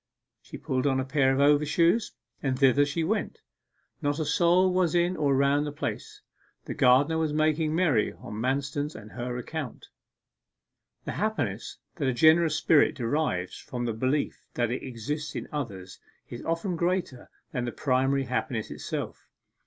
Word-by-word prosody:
She - - -10
pulled 130 +1 -1
on 135 -1 +2
a 130 - -1
pair 135 -1 +2
of 135 - +1
overshoes, 150 +8 +3 0.3
and 130 -2 -1
thither 140 +1 +4
she 160 +3 -1
went. 210 +6 -1 0.6
Not 145 -1 0
a 160 - -1
soul 175 +4 +3
was 180 -3 +2
in 175 +1 +2
or 145 -4 +1
around 140 +2 +2
the 145 - -3
place. 145 - -5 0.4
The - - -4
gardener 140 +6 +4
was 155 -2 0
making 155 0 +1
merry 155 -12 +2
on - - -10
Manston's 140 +3 -1
and 110 -1 -10
her 125 0 -4
account. 140 +2 -6 1.2
The - - -3
happiness - - -2 0.2
that 140 - -1
a 130 - +2
generous 160 +3 +5
spirit 150 -3 +4
derives 115 - -1
from 120 -1 -5
the 115 - -1
belief 130 +6 -1
that 120 -1 0
it 125 - -2
exists 145 +5 -5
in - - -4
others 100 -11 -6 0.3
is 120 - -8
often 165 +2 -1
greater 170 -6 -2 0.2
than 125 -1 -2
the 120 - -3
primary 135 +2 +1
happiness 125 -3 -3
itself. - - -5
145 Hz, 160 wpm, -27 LUFS, 130-160 Hz, 1.2 s, generous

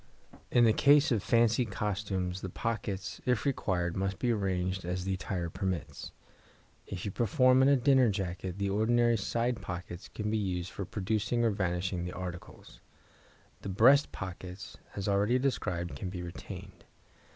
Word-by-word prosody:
In 120 - +4
the 110 -2 +5
case 145 +3 +5
of 110 -4 +2
fancy 115 +2 +3
costumes 100 -4 -2
the 95 - -4
pockets, 100 -2 -3
if 125 0 0
required, 90 -10 0
must 95 0 -1
be 120 - +1
arranged 95 -3 -1
as 90 +1 -3
the 95 - 0
attire 90 -2 -3
permits. 95 -3 -4 0.8
If 90 0 -5
you 100 - -2
perform 130 - +4
in 135 - +5
a 140 - +6
dinner 130 -1 +4
jacket, 95 -2 -3
the 100 -1 -1
ordinary 120 +3 +3
side 115 +2 -1
pockets 90 -1 -6
can 105 -1 -4
be 110 - +1
used 90 -3 -2
for 100 - -5
producing 110 +4 -1
or 115 - +3
vanishing 90 -2 -1
the 90 - -5
articles. 90 -1 -8 0.8
The - - -5
breast 130 +9 +5
pockets, 90 0 -7 0.2
as 100 - -3
already 100 +5 +3
described, 90 -10 -1
can 95 - -4
be 90 -1 -5
retained. 85 0 -9
100 Hz, 160 wpm, -31 LUFS, 90-115 Hz, 0.8 s, a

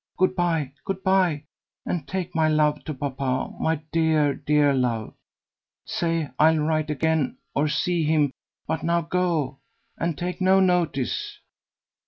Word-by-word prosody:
Good 185 0 +2
bye, 165 -6 0
good 190 -1 -4
bye, 185 -6 +2 0.4
and 165 -6 -3
take 185 -2 -3
my 160 -1 +2
love 150 -1 +2
to 155 - -3
papa, 130 -1 -2
my 160 - +1 0.2
dear, 160 -3 +2
dear 145 0 +2
love. 120 -4 -1 0.7
Say 165 -4 -1
I'll 160 +1 +5
write 155 0 0
again 150 -2 0 0.2
or 145 +2 +1
see 165 +3 0
him; 150 -3 +2 0.3
but 160 0 -2
now 170 +1 +1
go, 165 -5 -1 0.4
and 165 -3 -1
take 180 +1 -4
no 190 +1 +5
notice." 175 -8 0
160 Hz, 140 wpm, -24 LUFS, 145-175 Hz, 0.7 s, I'll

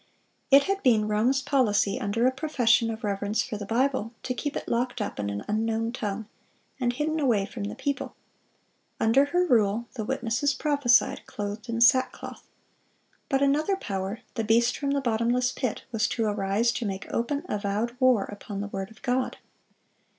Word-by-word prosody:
It 275 +1 +7
had 390 +3 -1
been 220 -5 +3
Rome's 240 +6 +2
policy, 215 -8 +2
under 215 +4 0
a 255 - +4
profession 255 -5 +2
of 225 +1 -5
reverence 205 +2 0
for 250 -3 -5
the 205 -1 -7
Bible, 245 -1 0
to 255 - -2
keep 285 +4 -4
it - - -4
locked 245 +1 -1
up 205 - -4
in 100 -1 -2
an 100 0 -5
unknown 225 +1 0
tongue, 215 -3 -4 0.5
and 245 -2 +1
hidden 305 +5 -1
away 235 -9 +2
from 210 0 -6
the - - -5
people. 280 -1 -3 0.8
Under 240 +6 +4
her 355 +5 +1
rule 225 - +2
the 225 - -4
witnesses 260 +3 0
prophesied, 285 -6 +2
"clothed 205 +3 -5
in 230 0 -2
sackcloth." 255 +1 +2 0.8
But 270 -1 +2
another 300 +8 +2
power—the 200 - -4
beast 235 +3 +3
from 280 - -2
the 280 0 +1
bottomless 240 +1 +1
pit—was 235 -2 -2
to 230 - -1
arise 205 +2 +1
to 235 - -3
make 195 -1 -4
open, 280 +6 -1
avowed 210 +3 -2
war 255 -6 +4
upon 205 0 -7
the 205 - -5
word 195 0 -5
of 220 - -19
God. 255 0 0
235 Hz, 170 wpm, -27 LUFS, 210-265 Hz, 0.8 s, It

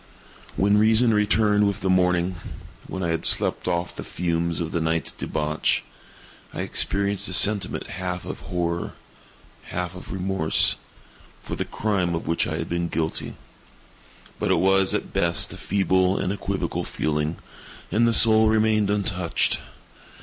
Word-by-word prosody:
When 100 +2 +3
reason 110 +2 +4
returned 105 0 +3
with 100 - -3
the 95 - -1
morning—when 90 +1 -2
I 85 - -1
had 80 0 -1
slept - - +3
off 85 -1 -2
the - - -6
fumes 85 -1 -2
of 80 -1 -3
the 85 - -1
night's 80 +1 -1
debauch—I 75 0 -4
experienced 100 0 0
a 95 - -4
sentiment 100 0 +2
half 90 0 -5
of - - -6
horror, 85 -1 -3 0.7
half 90 0 -4
of 90 - -10
remorse, 95 -3 +2 0.7
for - - -5
the - - -3
crime 95 -5 -1
of 80 - -5
which 85 +1 0
I - - -3
had - - -4
been 85 0 -2
guilty; 80 -1 -3 1.0
but - - -1
it - - +3
was, 95 0 +3
at - - -4
best, 85 -1 +1
a - - -9
feeble 95 -1 +1
and 95 - -1
equivocal 100 - -3
feeling, 75 +2 -2 0.6
and 115 +2 +3
the - - +3
soul 110 -1 +6
remained 110 -1 +2
untouched. 90 -4 0
90 Hz, 145 wpm, -24 LUFS, 85-100 Hz, 1.0 s, soul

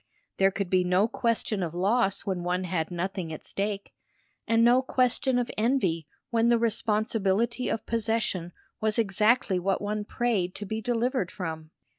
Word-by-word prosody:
There 195 0 +5
could 195 -1 -4
be 185 -1 +4
no 180 +4 +3
question 230 -3 -1
of 170 -2 -3
loss 195 +2 +2
when 185 -3 -2
one 180 +1 -1
had 170 -3 -2
nothing 180 -1 -3
at 155 - -7
stake, 200 0 -3 0.5
and 230 0 +4
no 245 +2 +6
question 255 0 +1
of 245 -1 -1
envy 195 - +1 0.2
when 230 0 +3
the 235 - +5
responsibility 225 +1 0
of 225 - -2
possession 220 -6 -1 0.3
was 215 0 +1
exactly 210 -1 +2
what 190 +2 0
one 210 +1 -2
prayed 205 -5 -1
to 210 - -6
be 220 +3 -3
delivered 240 -3 0
from. 160 -5 -6
210 Hz, 160 wpm, -27 LUFS, 185-230 Hz, 0.5 s, no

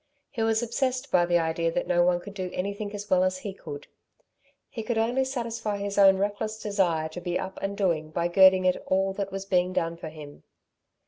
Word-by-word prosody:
He 230 - -4
was 225 +1 +2
obsessed 255 +3 -1
by 175 -1 +4
the 175 0 +3
idea 165 0 0
that - - -1
no 175 -1 +3
one 175 0 +2
could 200 +3 -10
do 185 -2 -4
anything 200 +2 -3
as 205 0 -6
well 185 -2 +3
as 185 0 0
he 195 +1 -6
could. 435 - -9 0.8
He 225 - -6
could 225 +1 -2
only 240 +4 +1
satisfy 230 -5 -3
his 200 0 -2
own 195 -1 +7
reckless 205 +2 -2
desire 185 -7 0
to 180 +3 -8
be 175 0 -1
up 190 0 -6
and 200 0 -3
doing 165 -6 0
by 170 +2 -1
girding 185 +1 +6
at 185 - +1
all 190 +1 +1
that 195 0 -4
was 195 0 -5
being 180 -1 +1
done 165 -1 -1
for 160 - -7
him. 150 -2 -11
195 Hz, 215 wpm, -27 LUFS, 175-215 Hz, 0.8 s, own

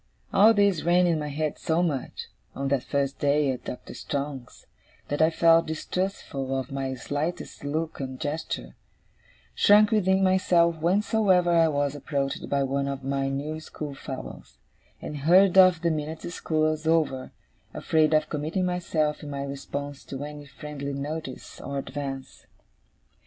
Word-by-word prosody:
All 220 +3 +6
this 200 -5 +3
ran 175 +1 +4
in 170 -3 +2
my 150 - -3
head 150 +1 -2
so 165 +1 +1
much, 145 -7 -3 0.3
on 140 0 -2
that 140 -2 +1
first 140 0 -2
day 145 -1 +2
at 125 - -6
Doctor 125 - -7
Strong's, 140 -3 -5 0.4
that 145 +2 -1
I 160 - +6
felt 165 0 +4
distrustful 155 -5 -3
of 130 0 -6
my 135 -1 -3
slightest 145 +7 -4
look 155 +3 -3
and 130 -1 -5
gesture; 145 - -4 0.8
shrunk 210 +1 +5
within 190 -3 +3
myself 180 -3 +3
whensoever 185 +1 +2
I 165 -1 +5
was 145 -2 0
approached 140 -1 -3
by 140 -1 +1
one 140 +1 -1
of 140 -1 -4
my 135 0 -1
new 145 +3 -3
schoolfellows; 140 - -8 0.5
and 150 - -5
hurried 180 +6 +5
off 185 -2 +7
the 170 - +3
minute 155 +1 -4
school 155 -2 0
was 155 0 -4
over, 155 -5 +1 0.4
afraid 155 -1 +2
of 155 0 +2
committing 155 +5 -2
myself 165 -4 -1
in 150 - -7
my 140 -1 -4
response 140 0 -6
to 135 +1 -6
any 145 0 -8
friendly 140 0 -6
notice 140 0 -6
or 140 0 -5
advance. 135 -1 -6
150 Hz, 150 wpm, -26 LUFS, 140-170 Hz, 0.8 s, off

